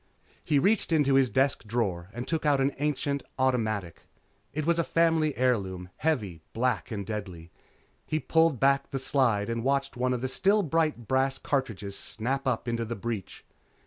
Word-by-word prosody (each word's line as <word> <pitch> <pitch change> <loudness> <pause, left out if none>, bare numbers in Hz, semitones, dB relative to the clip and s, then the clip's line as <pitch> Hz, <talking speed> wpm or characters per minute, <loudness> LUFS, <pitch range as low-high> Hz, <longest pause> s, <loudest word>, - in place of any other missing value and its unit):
He 150 - +2
reached 195 +6 +2
into 145 -4 +3
his 135 -2 +4
desk 135 +2 +1
drawer 100 -6 -2
and 120 +4 -6
took 160 -1 -1
out 145 -2 +3
an 135 +1 +2
ancient 145 -1 -1 0.2
automatic. 110 -9 -1 0.4
It 150 +2 -3
was 170 0 +2
a - - +3
family 165 -3 +2
heirloom, 95 -8 0
heavy, 105 - -1
black 125 0 0
and 100 -3 -4
deadly. 95 -6 -6 0.6
He 155 - 0
pulled 160 -4 +2
back 140 0 +3
the 135 - -3
slide 125 -6 +1
and 115 0 -2
watched 140 +1 0
one 125 +1 0
of 120 - -4
the 130 - -1
still 200 +10 +3
bright 155 - 0
brass 135 +2 +1
cartridges 105 -8 -2
snap 130 +5 -3
up 125 -1 -1
into 115 0 -1
the 115 +1 -4
breech. 110 -3 -5
130 Hz, 175 wpm, -28 LUFS, 110-145 Hz, 0.6 s, his